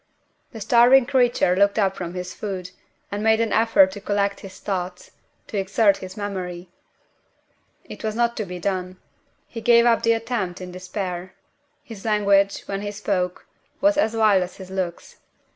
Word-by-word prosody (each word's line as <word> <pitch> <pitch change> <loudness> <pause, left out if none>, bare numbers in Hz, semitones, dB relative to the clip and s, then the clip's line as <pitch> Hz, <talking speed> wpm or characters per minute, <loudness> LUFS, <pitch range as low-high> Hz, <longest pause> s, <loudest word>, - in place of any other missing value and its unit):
The 225 - -9
starving 240 +4 +5
creature 245 -8 +2
looked 200 +2 +3
up 195 -2 +2
from 175 -1 -6
his 180 0 -5
food, 185 -3 -6 0.4
and 205 +1 -3
made 220 0 +3
an 230 -1 0
effort 210 -4 +4
to 205 - -9
collect 200 0 -1
his 195 -1 -11
thoughts 180 -2 -4 0.3
to 205 - -3
exert 195 +1 +2
his 185 +1 -9
memory. 185 -3 -5 1.1
It - - -11
was 215 -1 -2
not 235 0 +1
to 215 - -2
be 180 -1 -7
done. 185 0 -3 0.5
He 230 - -8
gave 235 0 +5
up 235 -1 +3
the 230 - +3
attempt 225 -6 -3
in 180 -1 -8
despair. 185 0 -5 0.5
His 220 -4 -11
language, 200 -2 +2
when 195 0 -5
he 205 - -4
spoke, 195 -3 -2 0.3
was 300 +1 +3
as 230 -7 +1
wild 215 -4 +4
as 180 0 -5
his 190 -1 -10
looks. 185 -3 -5
200 Hz, 170 wpm, -23 LUFS, 185-225 Hz, 1.1 s, starving